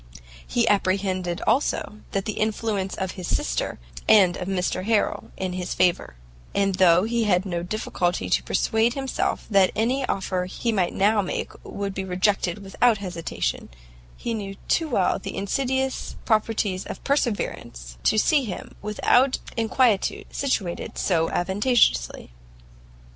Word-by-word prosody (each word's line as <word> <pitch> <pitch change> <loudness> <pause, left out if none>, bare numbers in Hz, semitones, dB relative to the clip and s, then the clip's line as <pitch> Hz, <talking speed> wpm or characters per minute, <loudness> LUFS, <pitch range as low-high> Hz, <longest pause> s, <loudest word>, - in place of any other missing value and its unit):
He 235 -2 +1
apprehended, 185 -3 0
also, 235 -5 0
the 195 +2 -1
influence 210 -3 -1
of 190 -1 -3
his 180 -3 -7
sister - - -1 0.3
and 195 -5 +6
of 180 - -5
Mr 185 -1 -1
Harrel 220 -1 0
in 185 -1 -3
his 180 -1 -3
favour; 175 - +1 0.4
and 195 -1 +2
though 180 -1 +5
he 230 +1 0
had 185 -2 +2
no 175 -3 -2
difficulty 180 -2 -2
to - - +2
persuade 225 +1 +1
himself 270 -2 -2
that 195 -2 +5
any 250 +5 +1
offer 185 -2 -1
he 230 +5 -2
might 190 -5 0
now 205 +2 +3
make 185 - -3
would 200 -1 -4
be 190 - -3
rejected 190 +1 0
without 220 +4 +2
hesitation, 180 -4 -3 0.5
he 235 - -3
knew 200 -3 -5
too 325 -2 +1
well 195 -8 +1
the - - -6
insidious 265 +6 -1
properties 215 -4 +1
of - - -7
perseverance, - - -2
to - - +3
see 285 +6 +3
him, 210 -7 -6
without 245 +5 +3 0.2
inquietude, 230 -2 +1
situated 200 -11 -2
so 165 -3 +1
advantageously. 190 - +1
200 Hz, 135 wpm, -24 LUFS, 185-225 Hz, 0.5 s, and